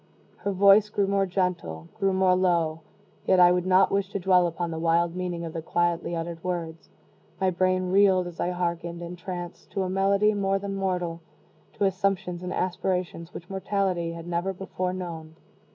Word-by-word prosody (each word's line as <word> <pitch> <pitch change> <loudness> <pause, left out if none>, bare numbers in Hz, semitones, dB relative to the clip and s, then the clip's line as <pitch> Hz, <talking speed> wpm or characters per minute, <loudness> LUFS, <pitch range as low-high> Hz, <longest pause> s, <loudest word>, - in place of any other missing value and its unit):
Her 200 - -2
voice 200 +2 +5
grew 205 -1 +1
more 195 0 +1
gentle 175 - -2
grew 195 0 +2
more 190 -1 +3
low 170 -4 +1 0.5
yet 185 - +4
I 175 0 +8
would 180 0 0
not 190 +1 +5
wish 195 -1 0
to 200 - -3
dwell 180 -1 +4
upon 170 0 -3
the 160 - -4
wild 170 +1 +2
meaning 175 -2 -3
of 165 - -6
the 165 - -4
quietly 175 +1 0
uttered 165 0 -5
words. 165 -3 -4 0.5
My 190 -1 +2
brain 185 0 +1
reeled 190 -2 +4
as 175 -1 -9
I 175 - 0
hearkened, 170 -1 -3
entranced, 175 0 -7
to 195 - 0
a 185 - -3
melody 200 +2 +3
more 195 -1 +1
than 200 0 -4
mortal 180 -3 -2 0.5
to 205 - 0
assumptions 190 -2 -1
and 180 0 -5
aspirations 180 -2 -2
which 175 - -9
mortality 190 -3 -1
had 165 0 -8
never 175 +2 -1
before 185 -1 -3
known. 165 -4 -6
180 Hz, 180 wpm, -26 LUFS, 170-195 Hz, 0.5 s, I